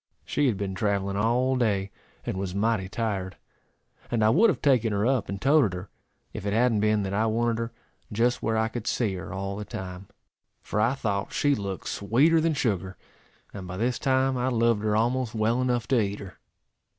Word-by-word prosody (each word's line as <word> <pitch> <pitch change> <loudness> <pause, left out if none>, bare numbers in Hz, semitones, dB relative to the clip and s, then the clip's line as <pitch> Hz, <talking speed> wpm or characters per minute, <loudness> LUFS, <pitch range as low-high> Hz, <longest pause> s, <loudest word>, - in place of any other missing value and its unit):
She 145 -1 +1
had 115 -6 +1
been 95 -1 -3
travelling 100 -1 -1
all 120 +5 +2
day, 100 -6 0 0.3
and - - -2
was 95 -1 -4
mighty 100 -2 0
tired; 100 -4 -3 0.7
and 115 -2 +1
I 110 - +5
would 210 - +5
have - - 0
taken 125 -6 +3
her 100 +1 +1
up, 130 -3 +1
and 100 0 -4
toated 135 -5 +3
her, 90 +2 -7 0.4
if - - -6
it 100 0 -1
hadn't 115 -1 +3
been 105 0 +2
that 95 0 -3
I 110 +3 +2
wanted 115 +1 0
her 115 0 -3 0.4
just 120 +3 +1
where 110 0 0
I 110 0 +2
could 115 0 -6
see 110 -6 0
her 90 -3 -6
all 100 +1 -4
the 105 - -5
time, 95 -1 -7 0.6
for 105 - -1
I 120 +5 +2
thought 100 -6 -2
she 145 0 +2
looked 100 -6 -4
sweeter 140 +11 +3
than 165 -1 +1
sugar; 100 -8 -1 0.6
and 95 -3 -7
by 90 +1 -6
this 120 +4 0
time 130 0 +2
I 125 +1 0
loved 115 -3 +2
her 105 0 +1
almost 120 +1 0
well 115 +3 +1
enough 120 -3 0
to 130 -4 +4
eat 100 0 -2
her. 95 -2 -10
110 Hz, 205 wpm, -26 LUFS, 100-125 Hz, 0.7 s, I